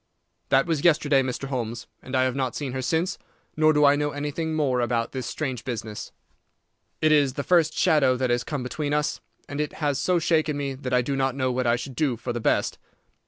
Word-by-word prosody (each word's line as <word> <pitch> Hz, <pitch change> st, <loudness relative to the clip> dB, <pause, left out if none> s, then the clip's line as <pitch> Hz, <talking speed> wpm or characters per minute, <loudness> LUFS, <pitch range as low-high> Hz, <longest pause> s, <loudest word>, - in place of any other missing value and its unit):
That 135 Hz, +2 st, +4 dB
was 160 Hz, -4 st, -1 dB
yesterday, 150 Hz, -4 st, +4 dB
Mr. 130 Hz, +1 st, -4 dB
Holmes, 120 Hz, -3 st, -3 dB, 0.2 s
and 130 Hz, -, -6 dB
I 130 Hz, -, +4 dB
have 130 Hz, -1 st, 0 dB
not 130 Hz, -3 st, -1 dB
seen 140 Hz, -3 st, -3 dB
her 130 Hz, +1 st, -3 dB
since, 165 Hz, +8 st, -1 dB, 0.4 s
nor 155 Hz, 0 st, +4 dB
do 150 Hz, -1 st, +4 dB
I 140 Hz, 0 st, +6 dB
know 145 Hz, 0 st, 0 dB
anything 150 Hz, +2 st, -3 dB
more 135 Hz, -5 st, +1 dB
about 120 Hz, -1 st, 0 dB
this 130 Hz, -3 st, -4 dB
strange 130 Hz, -6 st, -3 dB
business. 110 Hz, -4 st, -5 dB, 0.9 s
It 155 Hz, -, +5 dB
is 145 Hz, -3 st, +4 dB
the 140 Hz, -, -3 dB
first 165 Hz, -2 st, +3 dB
shadow 145 Hz, -7 st, +3 dB
that 130 Hz, -1 st, 0 dB
has 120 Hz, 0 st, +1 dB
come 145 Hz, -5 st, -4 dB
between 145 Hz, +3 st, -2 dB
us, 150 Hz, +1 st, -1 dB, 0.3 s
and 145 Hz, +1 st, -3 dB
it 150 Hz, -, -3 dB
has 145 Hz, -3 st, -1 dB
so 180 Hz, -1 st, +2 dB
shaken 155 Hz, -3 st, +1 dB
me 140 Hz, -1 st, -2 dB
that 130 Hz, -1 st, -6 dB
I 125 Hz, -1 st, +3 dB
do 140 Hz, +3 st, -2 dB
not 135 Hz, -1 st, 0 dB
know 130 Hz, -1 st, 0 dB
what 125 Hz, 0 st, -1 dB
I 120 Hz, -, +4 dB
should 125 Hz, +2 st, -6 dB
do 130 Hz, -3 st, 0 dB
for 120 Hz, +2 st, -4 dB
the 120 Hz, -, -3 dB
best. -, -, +1 dB
135 Hz, 225 wpm, -25 LUFS, 125-150 Hz, 0.9 s, I